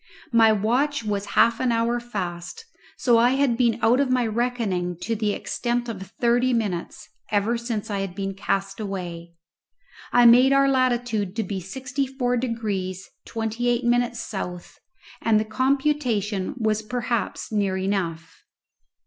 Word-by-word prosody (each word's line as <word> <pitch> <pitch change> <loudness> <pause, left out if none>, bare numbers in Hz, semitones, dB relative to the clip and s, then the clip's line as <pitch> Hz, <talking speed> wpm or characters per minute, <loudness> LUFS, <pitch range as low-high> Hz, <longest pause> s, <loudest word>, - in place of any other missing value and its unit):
My 225 -1 +6
watch 240 +7 +1
was 205 -1 -2
half 230 0 +5
an 255 -2 +1
hour 230 +1 +1
fast, 200 - -6 0.3
so 240 -3 +4
I 245 +2 +4
had 270 -3 +2
been 235 -2 +2
out 235 +3 +4
of 280 -2 +2
my 250 -1 +2
reckoning 215 -7 -1
to 230 - -1
the 210 -1 0
extent 240 +3 -2
of 220 -5 -5 0.2
thirty 245 +1 +3
minutes 205 -7 -3 0.2
ever 210 +3 +1
since 230 -2 -4
I 200 - -1
had 195 -2 -4
been 195 0 -3
cast 195 +1 -2
away. 175 -5 -5 0.8
I 245 0 +5
made 250 +3 +7
our 275 0 +4
latitude 245 -7 +1
to 225 - 0
be 195 0 -4
sixty 260 +8 -3
four 250 -2 -1
degrees 205 -6 -3
twenty 225 +2 -3
eight 240 +1 +1
minutes 240 0 +1
south, 180 -6 -6 0.4
and 220 -2 +3
the 215 - -1
computation 255 -4 0
was 220 -2 0
perhaps 235 +1 -3
near 200 -3 0
enough. 185 -4 -3
230 Hz, 150 wpm, -24 LUFS, 200-245 Hz, 0.8 s, made